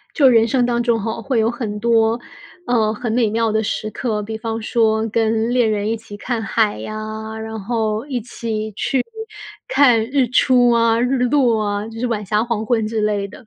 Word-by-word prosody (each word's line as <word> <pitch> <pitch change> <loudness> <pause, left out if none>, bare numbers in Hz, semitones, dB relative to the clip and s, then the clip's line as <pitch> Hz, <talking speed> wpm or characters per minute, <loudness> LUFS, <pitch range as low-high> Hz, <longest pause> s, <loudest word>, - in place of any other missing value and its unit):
就 280 -4 +6
人 230 -2 +5
生 245 +1 +1
当 240 -1 0
中 235 -2 +1
吼， 225 +2 -4
会 250 -1 0
有 220 +1 +2
很 220 -4 -5
多， 230 0 +2 0.5
呃， 220 -3 +2
很 230 +1 -4
美 230 -2 +2
妙 225 +1 +1
的 220 0 +1
时 215 0 -3
刻， 215 -4 -2
比 220 +2 -5
方 225 0 -4
说 220 0 +1
跟 225 +1 +1
恋 240 -3 +3
人 210 -1 -1
一 225 - 0
起 215 -2 -11
看 235 +1 -3
海 215 0 +1
呀， 215 0 -6
然 220 0 -6
后 220 +1 -2
一 255 -4 -3
起 220 -2 -4
去 255 +5 0 0.6
看 280 - +4
日 265 -4 +2
出 250 -1 +4
啊、 230 -1 +3
日 250 +2 +1
落 245 -4 +2
啊， 205 +1 -2
就 225 0 -9
是 250 - -1
晚 220 -3 -2
霞、 210 +3 +1
黄 230 -2 -2
昏 225 -2 +1
之 220 0 -2
类 210 -1 0
的。 225 +4 -14
225 Hz, 220 characters per minute, -19 LUFS, 215-240 Hz, 0.6 s, 就